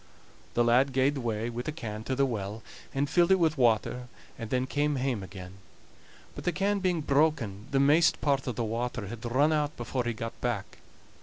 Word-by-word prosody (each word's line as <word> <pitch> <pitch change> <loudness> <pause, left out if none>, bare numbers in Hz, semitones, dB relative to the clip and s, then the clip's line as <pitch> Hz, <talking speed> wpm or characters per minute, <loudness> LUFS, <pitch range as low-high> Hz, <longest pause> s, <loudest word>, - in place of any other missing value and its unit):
The 120 - +4
lad 125 +3 +3
gaed 135 +2 +2
away 115 -3 -2
wi' 120 +1 -4
the 140 - -4
can 110 -8 -6
to 130 - -1
the 135 +1 +3
well, 110 -3 -4 0.3
and 140 +1 0
filled 175 +5 +3
it 190 - +6
wi' 165 -2 +4
water, 125 0 +1 0.3
and 115 -3 -7
then 130 +1 +1
came 145 +3 0
away 135 - -2
hame 125 -6 -1
again; 95 0 -9 0.8
but - - -8
the 175 - +1
can 200 +2 0
being 180 -4 0
broken 140 -8 +1
the 140 -2 +1
maist 150 +4 +4
part 140 -2 0
of 125 - -2
the 120 - -1
water 115 -1 -3
had 120 +1 -8
run 135 +6 +2
out 150 -1 -1
before 120 +1 -2
he 120 - -1
got 115 +1 -6
back. 120 -6 -3
125 Hz, 210 wpm, -29 LUFS, 115-145 Hz, 0.8 s, it